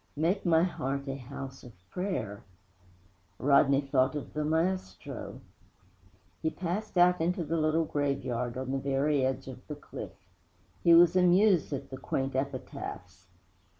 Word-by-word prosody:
'Make 175 +6 0
my 165 -1 +5
heart 140 -5 -2
a 135 - -2
house 135 0 -8
of 120 - -12 0.2
prayer!' 130 - -3 1.0
Rodney 140 0 +4
thought 135 0 +1
of 145 - -6
the 150 - -1
maestro. 160 - -2 1.0
He 160 - +1
passed 185 +5 -4
out 180 0 +5
into 175 +1 0
the 160 +2 -2
little 155 +1 +2
graveyard 130 -5 -2
on 130 0 -3
the 135 - 0
very 140 +1 +1
edge 130 0 -1
of 130 -1 -10
the 150 - -5
cliff. 145 - -8 0.7
He 170 -1 +7
was 170 +1 +7
amused 180 -1 +4
at 140 -1 -5
the 130 - -5
quaint 135 +1 -2
epitaphs. 95 -9 -5
140 Hz, 145 wpm, -30 LUFS, 130-170 Hz, 1.0 s, He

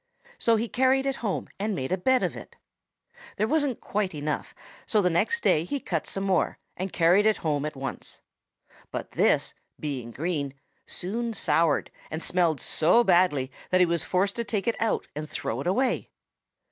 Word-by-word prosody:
So 230 - +4
he 225 +2 0
carried 260 +2 +2
it 275 -2 -1
home 205 -5 -2
and 210 0 -1
made 130 +2 -3
a - - +4
bed 260 +6 +3
of - - -1
it. - - -10 0.8
There 215 - +1
wasn't 290 -4 +1
quite 200 -5 -2
enough, 150 0 -3 0.3
so 215 - +3
the 180 -3 +3
next 465 - +1
day 155 - +4
he 280 +11 -3
cut 165 - -3
some 195 - -2
more 190 -2 +1 0.2
and 185 +1 -4
carried 180 +5 +4
it 215 - +3
home 145 -2 +1
at 150 - -4
once. 135 0 -6 0.7
But - - -5
this, - - +2 0.3
being 135 -6 -4
green, 145 0 -3 0.3
soon 230 +6 -2
soured 165 -7 +2 0.2
and 160 +1 -5
smelled 170 -5 +2
so 180 +10 +4
badly 175 - +3 0.2
that 185 - +3
he 180 - +6
was 170 -1 0
forced 195 +2 0
to 235 - 0
take 210 -3 -2
it 230 - 0
out 225 - +1
and 155 +1 -5
throw 115 +4 -3
it 145 - -4
away. 245 +7 +1
185 Hz, 185 wpm, -27 LUFS, 155-225 Hz, 0.8 s, he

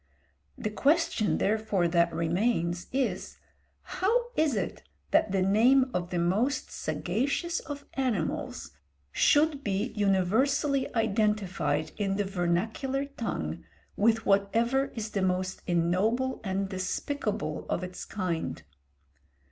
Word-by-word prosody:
The 215 - -3
question 295 -3 +2
therefore 210 -4 +1
that 170 0 +3
remains 175 0 0
is, 265 0 -2 0.5
how 475 +5 0
it 305 -5 +2
is - - -3 0.3
that 210 - +3
the 190 -1 +2
name 250 +7 +4
of 175 -1 -2
the 180 - -2
most 205 +11 0
sagacious 280 - -1
of 285 -1 -7
animals 230 - -2 0.4
should 295 - +3
be 205 +4 -1
universally 225 +8 +2
identified 210 -8 0
in 195 -2 0
the 205 0 0
vernacular 200 +10 -1
tongue 275 -5 -4 0.3
with 225 +1 +2
whatever 230 +7 +2
is 215 -2 -4
the 200 - -1
most 185 0 -1
ignoble 190 +10 +1
and 195 0 -1
despicable 190 - -3
of 180 - -1
its 180 0 -6
kind? 170 - -3
210 Hz, 115 wpm, -29 LUFS, 185-260 Hz, 0.5 s, name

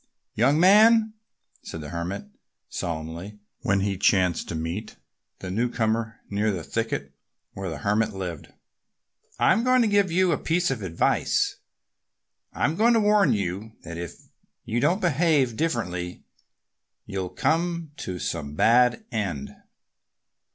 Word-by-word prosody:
"Young 135 +7 +3
man!" 215 +4 +6 0.5
said 80 - -7
the 75 - -7
Hermit 85 +1 -4 0.4
solemnly, 85 +5 -5 0.2
when 100 0 +1
he 100 -1 -1
chanced 90 -4 +2
to - - -3
meet 85 +7 -4 0.5
the 95 - -5
newcomer 115 0 -1
near 105 +2 0
the 95 -5 -2
thicket 110 -12 -3 0.4
where 95 -1 -5
the 80 - -5
Hermit 105 +8 +1
lived, 90 -6 -6 0.9
"I'm 225 - +3
going 255 0 +4
to - - +2
give 200 -3 +2
you 185 +1 +3
a 150 - +2
bit 175 -1 0
of 130 - -3
advice. 85 -4 +1 0.9
I'm 155 - 0
going 230 +5 +4
to 230 - +4
warn 210 -1 +4
you 100 +2 -3
that 85 0 -7
if 85 0 -6 0.5
you 115 - -1
don't 185 - +2
behave 150 -7 +2
differently 90 - -2 0.8
you'll 95 -3 -4
come 170 - -1
to 90 - -5
some 75 -4 -4
bad 125 - +4
end." 100 - -3
110 Hz, 135 wpm, -25 LUFS, -, 0.9 s, man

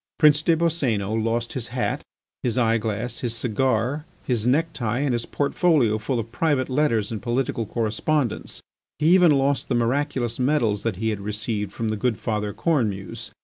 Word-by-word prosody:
Prince 150 -2 +5
des 165 +1 +3
Boscénos 115 - 0
lost 115 +1 -1
his 120 -4 -3
hat, 120 +1 -2 0.4
his 120 -2 -1
eye 115 -2 +3
glass, 110 +2 -3
his 120 -2 -2
cigar, 125 +4 0 0.2
his 120 -3 0
necktie, 125 -5 +1
and 140 -1 +1
his 120 -1 -2
portfolio 140 - +2
full 120 +4 -2
of 115 0 -4
private 140 0 +1
letters 125 -7 +1
and 110 - -4
political 120 -2 -1
correspondence; 120 +5 -1 0.3
he 155 +3 +4
even 180 -2 +6
lost 140 -1 +2
the 130 - +1
miraculous 120 0 0
medals 125 -7 +1
that 115 -4 -1
he 110 +4 -1
had 105 -2 -3
received 105 0 -3
from 115 -1 -3
the 110 - -1
good 115 +1 0
Father 105 -2 -2
Cornemuse. 110 -6 -1
120 Hz, 170 wpm, -24 LUFS, 110-140 Hz, 0.4 s, even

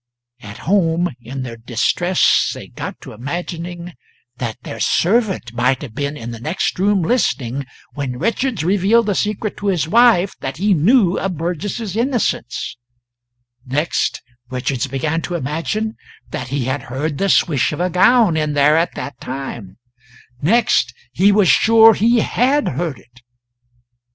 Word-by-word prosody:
At 100 -1 -10
home, 175 -2 +1
in 130 +3 -6
their 115 -2 -7
distress 130 +10 +2
they - - -10
got - - -7
to - - -10
imagining 170 +7 -6 0.4
that 120 -3 -4
their - - -7
servant 190 - +1
might 125 +3 +1
have 125 -6 -8
been 145 +4 -3
in 120 -3 -6
the 115 - -8
next 160 +8 -2
room 200 -1 +2
listening 140 - 0 0.3
when 135 -4 -4
Richards 230 - -1
revealed 200 +6 +3
the 205 - 0
secret 210 +2 -2
to 205 - -4
his 175 -5 +1
wife 220 -2 +4
that 135 - -5
he 200 +3 +2
knew 190 - +3
of 190 -4 -3
Burgess's 180 +5 -3
innocence; 230 - -1 0.9
next 145 +6 -1 0.3
Richards 130 0 -2
began 150 +5 -2
to 175 - -4
imagine 170 +9 -3 0.3
that 130 - -4
he 135 0 -2
had 130 +2 -2
heard 140 +4 -3
the 195 - +1
swish 150 -7 +2
of 150 - -5
a 180 +1 0
gown 215 0 +4
in 155 -1 0
there 145 +2 +4
at 165 +1 0
that 140 - -6
time; 125 -7 -7 0.6
next, 205 - +2 0.2
he 190 +9 +4
was 200 -2 +4
sure 225 +3 +6
he 230 +3 +3
had 270 +7 +1
heard 145 0 -3
it. 125 +1 -21
165 Hz, 150 wpm, -19 LUFS, 135-205 Hz, 0.9 s, sure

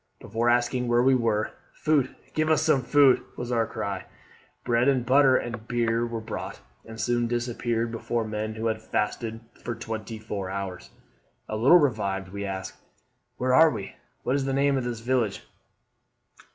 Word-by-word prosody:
Before 115 +1 -1
asking 120 +1 +1
where 120 0 +3
we 135 +1 +5
were, 115 -4 +1 0.2
'Food, 145 -4 +1 0.2
give 155 0 +1
as 155 - +3
some 155 -4 +3
food!' 140 0 +5 0.2
was 120 0 -4
our 115 -2 +1
cry. 100 -2 -4 0.6
Bread 120 +1 +2
and 130 -3 +2
butter 130 0 +5
and 120 -2 -5
beer 120 -1 +1
were 115 -1 -4
brought, 110 - -6 0.2
and 110 0 -10
soon 120 0 +1
disappeared 120 -1 -1
before 115 0 -2
men 110 0 -3
who 110 +1 -4
had 110 -1 0
fasted 110 +1 -2 0.2
for 120 - -3
twenty 110 0 -5
four 105 -3 -5
hours. 95 -2 -5 0.6
A 110 - -3
little 130 +11 +7
revived, 100 - 0
we 100 +1 -5
ask, 95 -1 -6 0.6
'Where 125 0 +1
are 160 +4 +7
we? 105 -8 -5 0.3
what 130 - +1
is 140 -1 0
the 135 - -1
name 140 +1 +3
of 130 -2 -1
this 120 -2 -4
village?' 120 -4 0
120 Hz, 170 wpm, -26 LUFS, 110-130 Hz, 0.6 s, little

